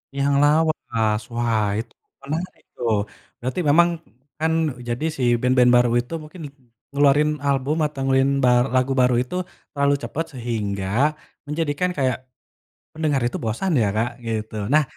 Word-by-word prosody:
Yang 140 +1 +1
lawas, 145 -8 +1
wah 115 -3 +1
itu 115 +1 -7 0.3
menarik 160 +6 -5
tuh, 115 -3 0 0.4
berarti 130 +8 -3
memang 170 +4 +5 0.5
kan 160 +1 +1 0.3
e - - -9
jadi 120 +6 -2
si 130 - -2 0.2
band-band 125 -1 +4
baru 120 0 +4
itu 125 +7 -11
mungkin 160 +3 -11 0.5
ngeluarin 145 +1 +4 0.2
album 140 +2 +1
atau 150 -2 -5
ngelin 135 0 +3
bar 125 -1 +5
lagu 130 +1 +2
baru 125 -1 +3
itu 130 - -7 0.4
terlalu 140 0 +3
cepat, 165 +2 -3
sehingga 110 -6 -3 0.6
menjadikan 150 +3 -1
kayak 130 -3 +1 0.8
pendengar 155 -4 0
itu 120 - -4
bosan 115 - -1
ya, - - +3
Kak, 115 +2 +1 0.2
gitu. 110 -1 -3 0.2
Nah, 155 0 +5
135 Hz, 145 wpm, -22 LUFS, 120-150 Hz, 0.8 s, memang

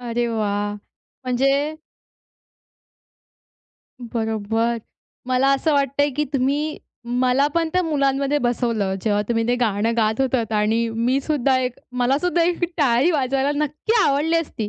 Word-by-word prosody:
अरे 240 0 -2
वाह! 205 -2 -1 0.5
म्हणजे 275 +4 +1 2.3
बरोबर. 225 0 -1 0.5
मला 255 +1 +2
असं 305 +3 0
वाटतंय, 280 0 +1
की 295 +3 -1
तुम्ही 285 +3 0 0.4
मला 255 +2 +3
पण 335 -1 +1
त्या 365 - +2
मुलांमध्ये 280 -2 +1
बसवलं. 235 -6 0
जेव्हा 205 -2 +1
तुम्ही 230 -1 0
ते 245 - +3
गाणं 220 -1 +1
गात 220 +1 +1
होतात 250 -4 0
आणि 220 +2 +1
मी 235 +4 0
सुद्धा 275 -2 +1
एक 250 -1 -3 0.2
मला 255 +3 +2
सुद्धा 350 0 +1
एक 345 +1 +1
टाळी 270 +2 +3
वाजवायला 275 -2 0
नक्की 300 +9 -3
आवडली 295 +4 +2
असती. 285 -10 -3
255 Hz, 130 wpm, -21 LUFS, 230-285 Hz, 2.3 s, मला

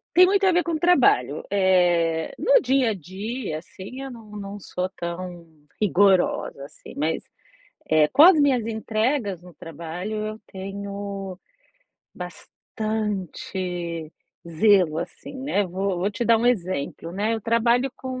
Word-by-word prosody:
Tem 365 +1 +8
muito 395 +1 +2
a 375 - +5
ver 350 -1 +2
com 335 0 -1
trabalho, 255 - +3
eh, 175 -4 +2
no - - +5
dia 265 - +2
a - - -1
dia 195 - -5
assim 190 +9 -10
eu 270 - -6
não 225 -3 -12
não 205 0 -7
sou 185 -1 -3
tão 175 0 -6 0.3
rigorosa 190 -7 +2
assim 140 - -13
mas, 155 +3 -1 0.7
eh, 155 -1 +4
com 285 - +5
as 345 -1 +9
minhas 260 -6 +3
entregas 220 - -1
no 180 -1 -14
trabalho 170 +6 -6
eu 215 +1 -6
tenho 195 0 -6 0.8
bastante 185 -6 -4 0.4
zelo 175 -2 +4
assim, 175 +10 -7
né, 205 -7 +1
vou 190 +1 -2
vou 190 +4 0
te 225 +3 -3
dar 230 -1 +5
um 235 - +1
exemplo, 180 -7 -1
né, 210 +4 0
eu 225 - -3
trabalho 235 +4 +2
com 260 -1 -5
200 Hz, 140 wpm, -24 LUFS, 175-230 Hz, 0.8 s, as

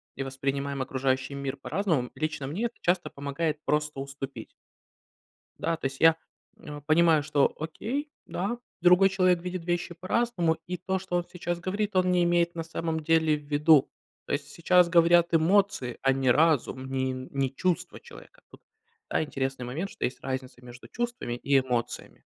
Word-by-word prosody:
и 135 - -3
воспринимаем 135 +1 -3
окружающий 130 +1 -1
мир 140 0 -4
по-разному. 165 -11 -1
Лично 150 -3 -3
мне 185 - -2
это 235 - -4
часто 175 0 0
помогает 145 +2 -2
просто 150 -2 0
уступить. 135 -3 -6 1.1
Да, 165 0 -1
то 145 - -4
есть 135 0 -5
я, 165 0 +6 0.4
м, 150 - -9
а, - - -8
понимаю, 155 +1 +4
что 145 -1 +2
окей, 240 - -4 0.2
да, 205 +7 -3 0.2
другой 180 +2 +6
человек 185 -2 +2
видит 180 -1 -5
вещи 175 0 -2
по-разному, 180 -2 0
и 180 0 -3
то, 190 +2 -2
что 185 -1 -3
он 175 - 0
сейчас 175 -1 -4
говорит, 200 +3 -2
он 185 0 +3
не 180 -1 +3
имеет 170 0 +2
на 165 - -3
самом 165 0 -3
деле 160 0 +3
в 150 - -10
виду. 150 0 +4 0.4
То - - -4
есть, 145 0 -2
сейчас 175 +3 +3
говорят 170 0 +4
эмоции, 165 -6 +2
а 135 0 +4
не 130 -1 +1
разум, 145 -2 +2
не 130 -1 -1
не 130 +1 -3
чувства 180 +3 -1
человека. 480 +1 -15
Тут, - - -16 0.5
да, - - +1
интересный 135 -4 -3
момент, 155 +11 -4
что - - -6
есть 125 - -2
разница 130 -1 -5
между 125 0 -12
чувствами 240 - -3
и 140 +3 +2
эмоциями. 125 -3 -3
160 Hz, 170 wpm, -27 LUFS, 135-180 Hz, 1.1 s, я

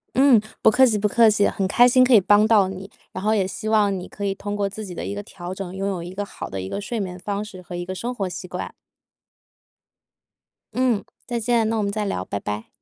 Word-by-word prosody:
嗯， 260 -4 +6 0.2
不 220 - +6
客 260 +3 +6
气 220 -4 +2
不 210 +1 +1
客 230 +2 +5
气， 205 -1 +3
很 195 - -1
开 240 +5 +5
心 255 +1 +5
可 255 0 +4
以 215 - +8
帮 205 +3 +5
到 210 -4 +5
你， 190 +1 -7 0.2
然 185 - -6
后 215 +1 +2
也 195 - +2
希 215 +3 -5
望 205 -3 +3
你 180 - -7
可 205 - -6
以 195 - 0
通 205 +1 -5
过 205 -1 0
自 210 +2 -7
己 180 - -8
的 - - -5
一 - - -4
个 205 - -4
调 180 -2 -8
整， 190 -1 -6
拥 195 +1 -2
有 185 -3 -3
一 175 +2 -8
个 205 +2 -3
好 - - -8
的 95 -1 -4
一 95 - -6
个 - - -3
睡 225 +2 -4
眠 180 -2 -4
方 200 +2 -3
式 195 -4 -10
和 175 - -8
一 175 0 -4
个 185 - -5
生 235 +6 -4
活 195 -5 -2
习 180 - -7
惯。 180 0 -6 2.0
嗯， 245 -5 +1 0.2
再 240 -1 -2
见， 230 -1 +2
那 225 - 0
我 215 - 0
们 200 - -1
再 210 0 -2
聊， 95 - -2
拜 100 - -4
拜！ 105 +2 -5
205 Hz, 285 characters per minute, -23 LUFS, 185-220 Hz, 2.0 s, 以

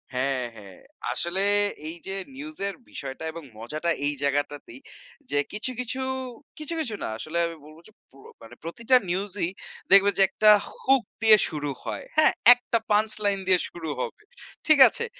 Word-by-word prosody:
হ্যাঁ, 130 -1 0
হ্যাঁ। 100 -3 -13 0.3
আসলে 175 +3 0 0.5
এই 165 - -3
যে 195 - -3 0.2
নিউজ 305 +3 -9
এর 200 - -5
বিষয়টা 135 +2 -7
এবং 165 -1 -9
মজাটা 155 +9 -3
এই 145 - +1
জায়গাটাতেই 140 -2 -2 0.5
যে 145 - +2
কিছু, 215 +5 -2
কিছু, 250 +2 -3 0.6
কিছু, 305 +2 -4
কিছু, 230 -8 -3
না - - -2
আসলে 155 +8 -5
আমি 165 - -8
বলব 155 +1 -15
যে 215 - -15 0.2
প্র 135 - -20 0.3
মানে 115 +2 -13
প্রতিটা 230 +10 +1
নিউজই 190 -1 -1 0.4
দেখবে 200 +1 +7
যে - - +3
একটা 215 +2 +3 0.3
হুক 265 -2 +3 0.2
দিয়ে 220 -1 +7
শুরু 145 -2 -3
হয়, - - -5
হ্যাঁ? 310 - +6 0.2
একটা 245 -1 -2
পাঞ্চ 215 +1 +3
লাইন 200 -1 +1
দিয়ে 185 -2 +4
শুরু 165 -2 -7
হবে, 425 - -6 0.4
ঠিক 310 -2 +6
আছে? 470 -1 -2
185 Hz, 165 wpm, -25 LUFS, 145-225 Hz, 0.6 s, দেখবে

